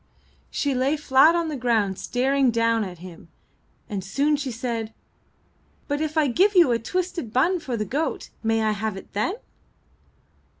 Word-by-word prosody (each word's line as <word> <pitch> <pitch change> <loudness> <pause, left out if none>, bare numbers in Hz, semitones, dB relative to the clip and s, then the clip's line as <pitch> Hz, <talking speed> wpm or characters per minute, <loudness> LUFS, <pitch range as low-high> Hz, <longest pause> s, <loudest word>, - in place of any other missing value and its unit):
She 285 -1 -1
lay 265 +4 +1
flat 295 +3 +5
on 340 -1 0
the 305 - -3
ground 225 -7 0
staring 265 +1 +1
down 230 -1 +1
at 185 -3 -7
him, 175 -1 -12 0.6
and 200 -3 -4
soon 285 +10 +1
she 285 -2 -3
said: 230 -2 -4 0.9
''But 290 0 -1
if 310 0 -2
I 310 - +4
give 375 - +2
you 340 -8 +6
a 230 - +1
twisted 350 - -3
bun 335 - +2
for 260 -7 -4
the 215 - -2
goat, 290 +8 -3
may 225 0 +1
I 215 - +2
have 215 -1 -3
it - - -12
then?" 215 - 0
255 Hz, 170 wpm, -24 LUFS, 220-300 Hz, 0.9 s, you